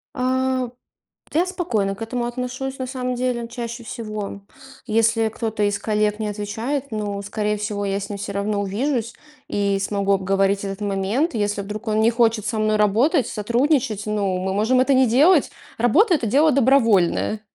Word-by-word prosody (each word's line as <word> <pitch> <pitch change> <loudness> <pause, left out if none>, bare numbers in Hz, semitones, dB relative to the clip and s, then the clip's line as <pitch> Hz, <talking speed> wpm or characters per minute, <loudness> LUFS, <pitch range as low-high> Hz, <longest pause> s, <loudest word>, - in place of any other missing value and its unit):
А, 260 -1 0 0.6
я 340 +4 +3
спокойно 225 - -1
к 225 - -17
этому 240 +1 -2
отношусь, 255 +2 -4
на 255 - -3
самом 250 -1 -3
деле, 250 -1 -1
ну, 230 - -6
чаще 235 0 -6
всего. 215 -4 -6 0.4
Если 225 0 +2
кто-то 220 -1 -3
из 205 0 +1
коллег 210 0 0
не 215 - -2
отвечает, 220 +7 -3
ну, 205 -2 -3
скорее 210 +1 -2
всего, 205 -1 -3
я 195 0 -1
с 200 - -6
ним 205 - -4
всё 200 0 -5
равно 200 +1 -1
увижусь 230 +4 -1 0.4
и 200 -1 0
смогу 200 0 0
обговорить 195 +1 +1
этот 195 0 -5
момент. 205 - 0
Если 205 -2 -1
вдруг 210 +3 -7
он 215 0 +1
не 230 +2 +4
хочет 225 -2 +2
со 215 0 -2
мной 215 0 +2
работать, 240 - +3
сотрудничать, 235 0 0
ну, 200 -3 -1
мы 190 +1 -2
можем 225 +6 +2
это 260 +2 +3
не 260 0 +5
делать. 290 +7 +4 0.3
Работа- 330 - +4
это 240 -8 +1
дело 295 +7 +4
добровольное. 225 -6 +3
220 Hz, 175 wpm, -22 LUFS, 205-255 Hz, 0.6 s, не